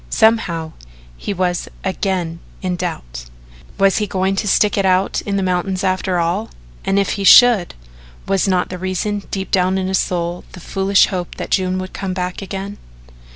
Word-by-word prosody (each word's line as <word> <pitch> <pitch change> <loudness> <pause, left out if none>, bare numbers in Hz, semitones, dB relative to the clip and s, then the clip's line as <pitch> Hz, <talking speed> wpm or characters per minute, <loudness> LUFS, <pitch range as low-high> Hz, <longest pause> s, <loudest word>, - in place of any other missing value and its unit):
Somehow 170 - +2 0.4
he 205 - -5
was 180 -2 -1 0.2
again 185 -3 -2 0.2
in 180 -1 -1
doubt 60 - -5 0.5
was 195 -1 +3
he 210 - -1
going 190 0 0
to 205 - -1
stick 205 +1 +3
it 200 - +1
out 185 0 +2
in 200 - 0
the 195 - 0
mountains 185 +1 -1
after 185 -1 0
all, 175 +6 -1 0.3
and 195 - +1
if 200 -1 +1
he - - -1
should, 225 -2 +7 0.5
was 195 0 +1
not 185 -2 +1
the 180 - -6
reason, 185 +3 -2
deep 190 -1 -4
down 185 0 +2
in 190 - -1
his 190 -1 +1
soul, 175 0 -2
the - - -9
foolish 195 +3 +3
hope 180 -2 -4
that - - -6
June 185 -1 +1
would 185 0 -5
come 190 -2 -4
back 180 +1 -3
again. 195 +1 -6
185 Hz, 180 wpm, -18 LUFS, 180-195 Hz, 0.5 s, should